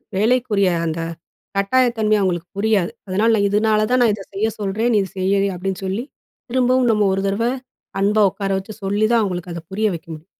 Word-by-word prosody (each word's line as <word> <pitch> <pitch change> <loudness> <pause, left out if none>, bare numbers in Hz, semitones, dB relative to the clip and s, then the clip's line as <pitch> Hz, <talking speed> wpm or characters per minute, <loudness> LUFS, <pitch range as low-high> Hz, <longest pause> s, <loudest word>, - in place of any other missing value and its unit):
வேலைக்குரிய 215 -2 +2 0.2
அந்த 160 +1 -3 0.6
கட்டாய 255 +6 +3
தன்மை 215 -1 +2
அவங்களுக்கு 180 -2 -1
புரியாது. 200 -4 +1 0.2
அதனால, 205 +5 +2
"நான் 200 -1 +2
இதனால 215 +1 +2
தான் 250 0 +3
நான் 230 -3 +4
இத 200 -1 -6
செய்ய 215 +3 0
சொல்றேன். 210 +4 0
நீ 210 - +5
இ - - -17
செய்" 195 +1 +1
அப்டீன்னு 190 +1 -4
சொல்லி, 195 +5 -2 0.5
திரும்பவும் 255 0 +3
நம்ம 210 -1 +2
ஒரு 195 +1 -1
தடவ 200 +4 0 0.6
அன்பா 210 +2 +3
ஒக்கார 195 0 -4
வச்சு 210 +3 -9
சொல்லி 205 +2 +1
தான் 230 -1 +4
அவங்களுக்கு 180 -2 -4
அதை 170 - -6
புரிய 215 +3 +1
வைக்க 165 +2 -11
முடியும். 155 +1 -11
200 Hz, 190 wpm, -20 LUFS, 190-220 Hz, 0.6 s, நீ